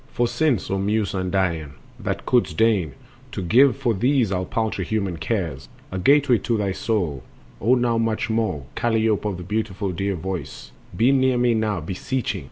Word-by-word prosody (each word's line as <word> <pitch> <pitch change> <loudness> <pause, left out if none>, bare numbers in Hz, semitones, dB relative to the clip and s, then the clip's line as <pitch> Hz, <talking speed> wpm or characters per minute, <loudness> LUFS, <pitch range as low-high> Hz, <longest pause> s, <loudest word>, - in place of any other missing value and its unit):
For 120 - +1
since, 135 - 0
O 95 - 0
Muse 105 +1 0
undying, 90 -6 -1 0.3
thou - - -1
couldst 115 -10 0
deign 100 - +2 0.4
To - - -3
give 125 +7 +5
for 120 - +1
these 125 +1 +2
our 95 -1 -1
paltry 110 -3 -2
human 100 -2 -2
cares 80 - -3 0.2
A 95 - -3
gateway 135 +2 +4
to 115 +3 -1
thy 100 -2 0
soul, 90 - -1 0.4
O 120 +6 +4
now 120 -2 +1
much 115 -1 0
more, 110 - -1
Kalliope 110 -3 +1
of 95 - -4
the 90 - -7
beautiful 105 0 -2
dear 95 +3 -2
voice, 90 +1 -6 0.3
Be 120 +4 +4
near 130 -2 +3
me 120 -1 +3
now 110 -5 0
beseeching! 95 +6 -3
105 Hz, 175 wpm, -23 LUFS, 95-115 Hz, 0.4 s, give